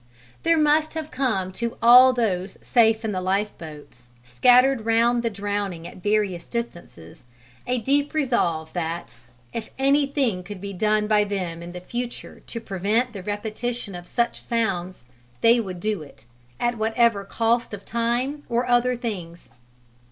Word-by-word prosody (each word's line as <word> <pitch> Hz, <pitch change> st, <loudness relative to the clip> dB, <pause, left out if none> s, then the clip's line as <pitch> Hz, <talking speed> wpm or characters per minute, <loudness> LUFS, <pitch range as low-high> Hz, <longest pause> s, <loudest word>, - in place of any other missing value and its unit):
There 330 Hz, 0 st, +3 dB
must 305 Hz, +1 st, +2 dB
have 315 Hz, -1 st, -5 dB
come 220 Hz, -9 st, -1 dB
to 235 Hz, +4 st, -4 dB
all 250 Hz, +2 st, +8 dB
those 195 Hz, -6 st, -1 dB
safe 225 Hz, -2 st, +3 dB
in 220 Hz, -, -1 dB
the 185 Hz, -2 st, -2 dB
lifeboats, 175 Hz, -9 st, -4 dB
scattered 245 Hz, -, +4 dB
round 230 Hz, +2 st, +3 dB
the 230 Hz, -, 0 dB
drowning 200 Hz, -4 st, -3 dB
at -, -, -11 dB
various 205 Hz, -4 st, 0 dB
distances, 175 Hz, -, -7 dB, 0.4 s
a 250 Hz, 0 st, +1 dB
deep 280 Hz, +6 st, 0 dB
resolve 175 Hz, -, 0 dB
that, 170 Hz, -5 st, -4 dB, 0.4 s
if 230 Hz, -, -5 dB
anything 275 Hz, -6 st, +1 dB
could 190 Hz, +2 st, -9 dB
be 200 Hz, +1 st, -6 dB
done 210 Hz, +2 st, +1 dB
by 210 Hz, -1 st, +3 dB
them 185 Hz, -5 st, -4 dB
in 170 Hz, +1 st, -8 dB
the 180 Hz, -, -7 dB
future 240 Hz, +5 st, -6 dB
to 230 Hz, -, -5 dB
prevent 220 Hz, +4 st, -1 dB
the 200 Hz, -, -6 dB
repetition 215 Hz, +2 st, -4 dB
of 175 Hz, 0 st, -8 dB
such 235 Hz, +3 st, -1 dB
sounds, 185 Hz, -, -2 dB, 0.4 s
they 235 Hz, +1 st, +5 dB
would 185 Hz, -5 st, -5 dB
do 210 Hz, -1 st, -2 dB
it 140 Hz, -6 st, -14 dB, 0.3 s
at 240 Hz, -1 st, -1 dB
whatever 225 Hz, -1 st, +2 dB
cost 230 Hz, +4 st, 0 dB
of 205 Hz, -1 st, -8 dB
time 240 Hz, +5 st, -1 dB
or 240 Hz, +1 st, +1 dB
other 245 Hz, 0 st, +2 dB
things. 180 Hz, -8 st, -6 dB
220 Hz, 150 wpm, -24 LUFS, 185-240 Hz, 0.4 s, all